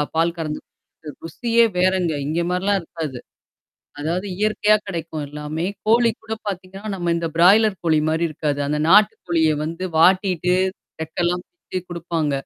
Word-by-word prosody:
பால் 165 +1 +2
கறந்துக் 155 -2 -4
குடிக்கிற 150 -2 -14
ருசியே 235 +8 +2
வேறங்க. 185 -2 +2 0.2
இங்கே 165 +3 0
மாரிலாம் 195 +2 +1
இருக்காது. 160 -6 -6 0.8
அதாவது 170 +6 -2
இயற்கையா 215 0 +3
கெடைக்கும் 165 -4 -4
எல்லாமே. 150 +3 -4 0.2
கோழி 230 +1 +4
கூட 220 0 -7 0.2
பாத்தீங்கன்னா, 195 +1 -7
நம்ம 175 -2 -1
இந்த 170 -1 -2
பிராய்லர் 195 +3 +5
கோழி 160 -2 +3
மாரி 165 +2 0
இருக்காது. 145 -1 -2
அந்த 150 0 0
நாட்டு 210 +4 +6
கோழிய 160 -2 +3
வந்து 165 +4 -4
வாட்டிட்டு 180 0 +3 0.5
ரக்கெல்லாம் 175 +2 -2
பிச்ச 330 - -7
குடுப்பாங்க. 170 -3 -2
175 Hz, 140 wpm, -21 LUFS, 160-195 Hz, 0.8 s, நாட்டு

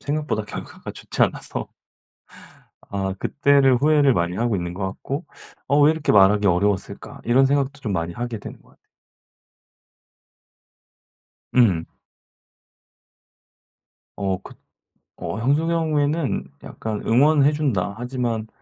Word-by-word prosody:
생각보다 145 -7 -2
결과가 105 - -8
좋지 - - -2
않아서 - - -2 1.2
아 95 -1 -2
그때를 140 -2 +3
후회를 145 0 +4
많이 85 -1 -1
하고 115 -3 0
있는 85 0 -4
것 95 0 -3
같고 140 - -5 0.4
'어 145 +2 +3
왜 150 +2 +6
이렇게 160 -2 -2
말하기 100 +1 +5
어려웠을까?' 95 +2 -1
이런 130 +3 +4
생각도 140 0 0
좀 110 -7 -3
많이 85 -1 -2
하게 120 +2 -4
되는 - - -10
것 - - -24
같아 - - -27 2.8
음. 95 -10 +3 2.3
어 95 -2 -1
그 - - -12 0.7
어 110 - -4
형수 145 +8 +1
경우에는 155 -2 0 0.2
약간 110 -2 -5
"응원해 145 +4 +4
준다. 120 -11 -1
하지만 120 -3 -3
120 Hz, 245 characters per minute, -22 LUFS, 100-145 Hz, 2.8 s, 왜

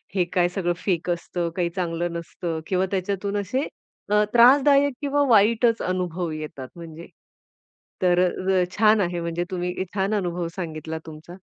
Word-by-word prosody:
हे 180 - +3
काय 175 -2 +3
सगळं 180 -2 -1
फेक 180 -2 -1
असतं, 170 0 -2
काही 175 -2 0
चांगलं 175 -1 -2
नसतं 170 0 -4
किंवा 185 0 +1
त्याच्यातून 200 +1 -2
असे 255 +9 -2 0.4
अ, 210 0 +4
त्रासदायक 275 +3 +6
किंवा 285 0 +1
वाईटच 230 +2 +4
अनुभव 180 -2 -2
येतात 150 -4 -6
म्हणजे. 165 -1 -10 0.9
तर 180 -1 +3 0.5
छान 215 0 +4
आहे, 175 -1 -1
म्हणजे 170 +1 -2
तुम्ही 180 0 -2 0.2
छान 195 +1 0
अनुभव 175 -4 -1
सांगितला 160 -3 -5
तुमचा. 160 +2 -11
180 Hz, 140 wpm, -24 LUFS, 170-205 Hz, 0.9 s, त्रासदायक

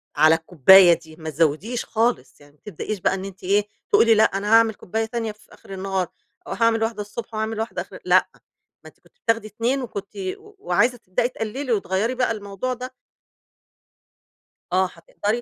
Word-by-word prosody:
على 160 +1 +6
الكوباية 175 +3 +7
دي 160 -1 -7
ما 160 -1 -7
تزوديش 165 - 0
خالص، 230 -7 -1
يعني 145 0 -19
ما - - -35
تبدئيش 210 +1 -5
بقى - - +1
إن 190 0 -4
أنتِ 195 -1 -10
إيه 200 +3 +2 0.2
تقولي 230 -1 +5
لأ 215 - +5
أنا 205 +3 +1
هاعمل 225 -1 +5
كوباية 220 +4 -3
تانية 225 -1 -3
في 210 +1 -20
آخر 195 - -13
النهار، 190 -1 -2 0.4
أو - - -4
هاعمل 230 -1 +2
واحدة 225 -2 -2
الصبح 210 +3 -8
وهاعمل 220 0 -2
واحدة 225 +1 -3
آخر - - -11
لأ، - - +4 0.5
ما - - -13
أنتِ - - -28
كنت 485 - -28
بتاخدي 225 -1 0
2 235 +6 -1
وكنتِ 205 -5 -6 0.3
وعايزة 405 - 0
تبدئي 225 +2 -1
تقللي 255 +3 -4
وتغيّري 205 +4 -1
بقى 250 -2 +1
الموضوع 205 +3 -4
ده. 255 +1 -8 1.8
آه 185 +1 +4
هتقدري، 205 +7 -3
215 Hz, 175 wpm, -23 LUFS, 190-230 Hz, 1.8 s, الكوباية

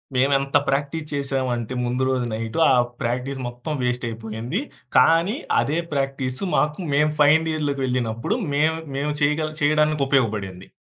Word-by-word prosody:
మేమెంత 135 +2 +3
ప్రాక్టీస్ 145 +3 -1
చేసావంటే 130 -4 -1
ముందు 125 +2 -1
రోజు 130 -2 0
నైటు 115 +5 -3
ఆ - - +5 0.3
ప్రాక్టీస్ 125 +3 -2
మొత్తం 125 +6 -5
వేస్ట్ 125 0 -1
అయిపోయింది. 115 - -4 0.4
కానీ 165 +7 +4 0.2
అదే 150 +3 0 0.2
ప్రాక్టీసు 135 0 -2
మాకు 150 +2 +1
మేము 150 +2 +3
ఫైనల్ 155 +2 +5
ఇయర్‌లోకి 145 -3 -2
వెళ్ళినప్పుడు 125 - -1 0.2
మేము 155 +3 +2 0.2
మేము 145 +2 -1
చేయగ 150 +2 +1
చేయడానికి 150 0 +2
ఉపయోగపడింది. 105 -8 0
135 Hz, 135 wpm, -23 LUFS, 125-150 Hz, 0.4 s, ఆ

